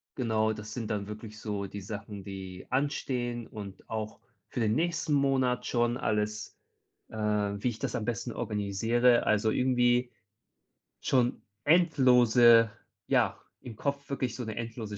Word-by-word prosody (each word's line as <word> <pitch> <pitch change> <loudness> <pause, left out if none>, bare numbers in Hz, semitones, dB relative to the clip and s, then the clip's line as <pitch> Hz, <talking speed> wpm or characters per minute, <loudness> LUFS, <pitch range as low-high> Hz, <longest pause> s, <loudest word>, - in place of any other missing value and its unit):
Genau, 110 -3 +1
das 105 0 -8
sind 115 -3 -4
dann 100 -1 -2
wirklich 110 0 -8
so 105 -2 -3
die 100 +1 -7
Sachen, 100 0 -7
die 95 -2 -8
anstehen 125 -3 -1
und 100 -3 -10
auch 110 -1 -4 0.3
für - - -4
den 110 -1 +2
nächsten 160 0 0
Monat 135 -3 +2
schon 120 0 +1
alles, 105 -1 -2 0.5
äh, - - -10
wie 105 +1 0
ich 115 - -7
das - - -3
am 105 - -2
besten 120 0 -3
organisiere. 115 +4 +2
Also, 110 +1 +2
irgendwie 125 -1 +2 0.9
schon 125 -2 +1 0.2
endlose 125 -8 +6 0.4
ja, - - +2 0.2
im 115 -3 -9
Kopf 140 +2 -3
wirklich 130 -3 -2
so 125 - -4
'ne 110 - -5
endlose 115 -3 -5
115 Hz, 145 wpm, -29 LUFS, 105-125 Hz, 0.9 s, endlose